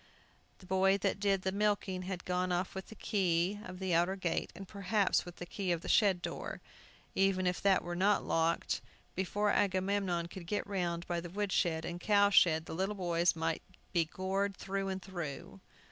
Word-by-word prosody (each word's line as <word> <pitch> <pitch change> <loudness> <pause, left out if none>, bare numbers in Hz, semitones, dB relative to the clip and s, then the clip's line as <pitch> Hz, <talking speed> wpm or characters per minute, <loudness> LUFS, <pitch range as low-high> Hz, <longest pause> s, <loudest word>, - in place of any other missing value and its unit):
The 185 - -16
boy 190 +1 +3
that 195 - -1
did 195 -2 +1
the 190 - 0
milking 200 -2 0
had 185 -1 -5
gone 180 0 0
off 180 +1 -1
with 190 0 -6
the 220 - -11
key 190 -2 +1
of 185 -2 -8
the 190 -1 -1
outer 175 +3 +3
gate, 185 -3 -2
and 195 +1 -8
perhaps 200 0 +1
with 175 0 -9
the 175 - -7
key 185 +1 -2
of 170 -1 0
the - - -8
shed 195 -4 +4
door. - - -4 0.5
Even 190 -1 +2
if 180 0 0
that 195 -2 +4
were 175 0 -4
not 200 +3 +2
locked, 165 +1 +1 0.3
before 205 +3 0
Agamemnon 190 -3 +1
could 170 -1 -9
get 205 +3 -1
round 175 -4 -2
by 170 -1 -2
the 175 - -7
wood 200 +2 -2
shed 160 -3 +1
and 175 0 -4
cow 205 0 +4
shed, 160 -4 +5
the - - -6
little 190 +5 -1
boys 175 -2 +2
might 165 0 -1 0.3
be 170 -2 +3
gored 190 +3 -2
through 195 0 -3
and 190 -1 -3
through! 160 - -6
185 Hz, 195 wpm, -33 LUFS, 175-195 Hz, 0.5 s, shed